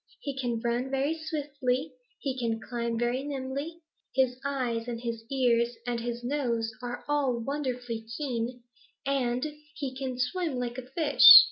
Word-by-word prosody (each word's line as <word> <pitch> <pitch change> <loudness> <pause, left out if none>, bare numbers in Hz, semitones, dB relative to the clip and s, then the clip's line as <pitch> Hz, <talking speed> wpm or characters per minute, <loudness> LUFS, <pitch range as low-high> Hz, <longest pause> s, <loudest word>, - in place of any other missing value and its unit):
He 280 -2 -4
can 245 -4 -1
run 240 +2 0
very 275 +4 +1
swiftly; 285 -3 -2 0.3
he 270 -2 -2
can 230 -3 -1
climb 235 0 -2
very 240 +3 0
nimbly; 280 +4 -4 0.3
his 260 -2 +3
eyes 250 -5 -1
and 235 -1 -3
his 230 -1 -4
ears 240 -3 +3
and 240 -1 -1
his 240 0 -4
nose 240 -4 0
are 245 0 -5
all 280 -5 +2
wonderfully 245 -4 -3
keen, 245 -4 -2 0.4
and 255 -2 +1 0.3
he 270 -3 -4
can 260 -1 -3
swim 310 +2 0
like 245 0 -2
a 255 0 -10
fish. 305 +2 +10
255 Hz, 150 wpm, -29 LUFS, 240-275 Hz, 0.4 s, fish